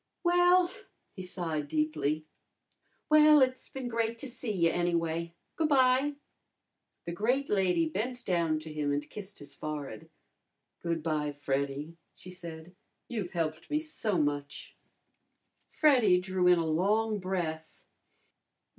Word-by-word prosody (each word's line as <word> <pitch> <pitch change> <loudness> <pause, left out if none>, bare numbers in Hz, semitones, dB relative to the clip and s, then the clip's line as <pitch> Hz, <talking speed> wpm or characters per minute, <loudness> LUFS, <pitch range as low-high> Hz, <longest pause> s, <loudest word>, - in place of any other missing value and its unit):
Well," 355 0 +4 0.4
he 185 - -6
sighed 165 -5 -3
deeply 155 - -1 0.8
"well, 305 0 +7
it's 255 0 -2
been 265 -2 -5
great 230 -1 -1
to 270 - -6
see 245 -2 -5
you, 170 -4 +2
anyway. 170 -1 -1 0.2
Goo' 320 - +2
bye." 270 0 +3 0.9
The 170 - -4
great 245 +10 0
lady 180 -5 +2
bent 240 +9 -4
down 170 -4 +1
to 155 0 -8
him 150 -1 -1
and 145 +1 -2
kissed 205 +3 -9
his 145 -1 -9
forehead. 145 -7 -6 0.7
"Good 170 -2 -2
bye, 150 -2 -1
Freddy," 140 +3 -3 0.2
she 185 - -12
said. 170 -1 -9 0.3
"You've 210 -7 -4
helped 160 -2 -2
me 300 - +1
so 305 - -2
much." 145 -2 -2 0.9
Freddy 245 - +4
drew 185 0 0
in 180 0 +6
a 165 - 0
long 205 +7 +1
breath. 170 -4 -4
180 Hz, 130 wpm, -30 LUFS, 155-240 Hz, 0.9 s, well